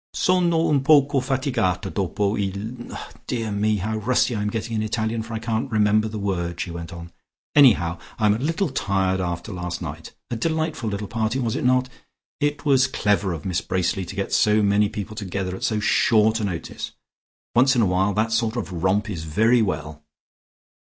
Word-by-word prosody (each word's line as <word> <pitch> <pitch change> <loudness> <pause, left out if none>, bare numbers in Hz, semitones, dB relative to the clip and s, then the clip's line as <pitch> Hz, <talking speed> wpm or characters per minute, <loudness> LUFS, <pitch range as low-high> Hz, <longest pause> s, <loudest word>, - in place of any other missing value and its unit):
"Sono 180 -2 +2
un 145 -3 +2
poco 140 -1 +4
fatigata 130 -8 -1
dopo 100 +2 0
il 105 +4 -4 0.4
dear 115 -3 -2
me 105 +1 +1
how 110 +3 -2
rusty 125 +3 +1
I 105 - -2
am 105 - 0
getting 115 +1 -3
in - - 0
Italian 110 +1 -1
for 110 0 -6
I - - -1
can't 115 +2 -2
remember 110 -1 +3
the 110 0 -5
word," 85 -4 -2
she 90 - -3
went 85 0 -7
on. 85 0 -9 0.4
"Anyhow 95 - +5 0.2
I 110 - +1
am 105 - +5
a 110 - -2
little 165 +6 0
tired 95 -5 0
after 90 +4 -4
last 90 -1 -4
night. 80 -1 -7 0.2
A - - 0
delightful 160 -1 -1
little 100 0 -4
party, 110 +2 -1
was 120 -4 -1
it - - -2
not? 130 0 +3 0.5
It 145 +1 -1
was 135 -2 +4
clever 105 -6 +1
of 80 -3 -6
Miss 90 -2 0
Bracely 95 +1 -1
to 95 - -8
get 100 0 -3
so 105 0 +4
many 100 0 +3
people 105 +1 -6
together 95 -2 -3
at - - -9
so 110 -2 +1
short 110 +1 +3
a 105 - -1
notice. 90 -4 -5 0.6
Once 130 +3 +4
in 120 - +3
a - - +4
while 95 +2 +1
that 110 +1 +1
sort 110 0 +1
of 90 -8 -4
romp 100 +3 +2
is 90 -7 -5
very 110 +9 +3
well." 75 -6 -3
105 Hz, 195 wpm, -23 LUFS, 95-120 Hz, 0.6 s, Anyhow